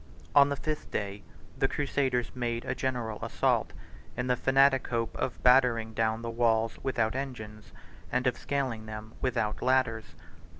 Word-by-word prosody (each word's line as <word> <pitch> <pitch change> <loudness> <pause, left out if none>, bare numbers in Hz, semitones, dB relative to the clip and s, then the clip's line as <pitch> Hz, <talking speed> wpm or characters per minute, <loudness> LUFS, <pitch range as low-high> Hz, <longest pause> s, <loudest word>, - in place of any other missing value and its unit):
On 140 0 +7
the 140 - 0
fifth 150 +2 -4
day, 100 0 -3 0.3
the 135 - +1
crusaders 135 -4 0
made 120 -2 -2
a - - -1
general 120 -5 -3
assault, - - +1 0.5
in 125 - -1
the 125 -1 +2
fanatic 135 +1 +3
hope 115 -2 -2
of 125 - -2
battering 125 -3 +4
down 110 +1 0
the 115 - -3
walls 115 -1 +1
without 115 -4 0
engines, 110 -6 -6 0.4
and 125 +1 0
of 125 - +2
scaling 130 -6 -3
them 110 0 -8
without 115 -5 -1
ladders. 130 -4 +1
120 Hz, 155 wpm, -29 LUFS, 110-130 Hz, 0.5 s, On